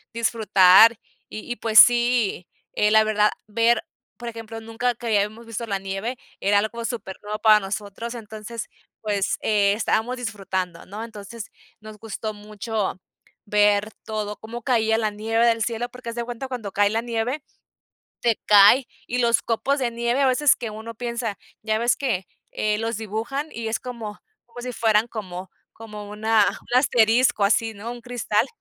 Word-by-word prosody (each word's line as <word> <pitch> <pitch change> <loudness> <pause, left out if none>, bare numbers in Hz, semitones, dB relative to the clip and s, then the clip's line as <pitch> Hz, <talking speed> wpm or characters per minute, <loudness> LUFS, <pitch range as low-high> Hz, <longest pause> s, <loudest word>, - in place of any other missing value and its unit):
disfrutar. 220 -1 +6 0.3
Y 215 +3 -8
y, 240 - -2
pues 220 -1 +3
sí, 240 -6 +5 0.3
eh, 210 0 +2
la 220 0 +6
verdad 210 -1 +3 0.2
ver, 230 +2 +2 0.4
por 240 -1 -6
ejemplo, 225 -1 -8
nunca 225 +2 -2
que 235 +1 -9
habíamos 215 +2 0
visto 230 +1 -5
la 200 -2 -1
nieve, 195 +6 -4 0.2
era 205 +1 +3
algo 230 +3 -2
super 210 -6 -5
nuevo 210 +1 -4
para 215 -1 +6
nosotros, 205 +4 -5
entonces, 220 0 -7 0.3
pues 205 -3 -1
eh, 205 -2 +2
estábamos 230 +3 0
disfrutando, 190 -6 -4
¿no? 210 +3 -7
Entonces, 220 0 -9 0.3
nos 215 0 -11
gustó 220 0 -5
mucho 210 -1 -4 0.5
ver 205 0 +3
todo, 210 -1 -4
cómo 235 +2 -8
caía 225 -3 +2
la 215 -2 0
nieve 225 +3 +1
del 230 -1 +2
cielo, 240 +1 -3
porque 250 -2 -8
haz - - -7
de 235 - -2
cuenta 245 +2 -6
cuando 230 -6 -5
cae 205 0 +3
la 225 +1 0
nieve, 240 +4 -2 0.8
te 235 -2 +1
cae, 210 +5 +7 0.2
y 245 - -1
los 235 -1 +3
copos 270 +5 0
de 240 -2 0
nieve 235 +3 -1
a 275 - +4
veces 265 +2 +4
que 230 -3 -5
uno 220 +2 -8
piensa, 235 -2 -3 0.3
ya 215 0 0
ves 235 +2 +2
que, 225 -10 -1 0.3
eh, 210 0 0
los 225 0 -2
dibujan 225 +8 -4
y 230 -1 -6
es 220 - -2
como 230 -4 -7 0.3
como 245 +1 -10
si 250 - -4
fueran 220 0 +2
como 185 -4 -7 0.2
como 210 -2 -9
una 215 0 +2
un 245 - 0
asterisco 235 -3 +3
así, 225 +2 +2
¿no? 215 +4 -7
Un 240 0 -7
cristal. 240 -1 0
225 Hz, 170 wpm, -23 LUFS, 210-235 Hz, 0.8 s, cae